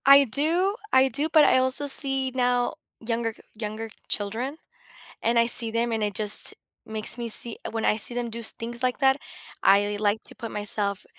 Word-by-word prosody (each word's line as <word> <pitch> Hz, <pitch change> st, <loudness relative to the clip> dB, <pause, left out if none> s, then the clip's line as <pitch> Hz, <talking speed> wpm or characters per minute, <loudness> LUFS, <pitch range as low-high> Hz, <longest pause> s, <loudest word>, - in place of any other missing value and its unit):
I 275 Hz, +1 st, +7 dB
do. 325 Hz, -, 0 dB, 0.2 s
I 260 Hz, 0 st, +4 dB
do, 290 Hz, +4 st, +2 dB
but 310 Hz, -2 st, +5 dB
I -, -, +3 dB
also 260 Hz, +2 st, +1 dB
see 270 Hz, -1 st, +1 dB
now 245 Hz, -1 st, -1 dB, 0.3 s
younger 230 Hz, 0 st, -4 dB
g -, -, -21 dB
younger 215 Hz, +1 st, -7 dB, 0.2 s
children, 230 Hz, +8 st, -5 dB, 0.6 s
and 235 Hz, +1 st, -1 dB
I 235 Hz, -, +3 dB
see 235 Hz, -1 st, +6 dB
them, 230 Hz, +1 st, -2 dB
and 225 Hz, -1 st, -3 dB
it 205 Hz, -1 st, -3 dB
just 210 Hz, 0 st, -1 dB, 0.3 s
makes 220 Hz, +1 st, +1 dB
me 235 Hz, -1 st, -6 dB
see 230 Hz, +1 st, +4 dB
when 225 Hz, -1 st, -4 dB
I -, -, +1 dB
see 230 Hz, -, +4 dB
them 240 Hz, -1 st, -4 dB
do 230 Hz, +1 st, -8 dB
s 230 Hz, -, -2 dB
things 235 Hz, +2 st, -4 dB
like 250 Hz, -1 st, -2 dB
that, 265 Hz, -1 st, +2 dB, 0.5 s
I 205 Hz, +1 st, +2 dB
like 210 Hz, +1 st, -1 dB
to -, -, -14 dB
put 230 Hz, -3 st, -9 dB
myself 205 Hz, -1 st, +3 dB
235 Hz, 200 wpm, -23 LUFS, 220-260 Hz, 0.6 s, I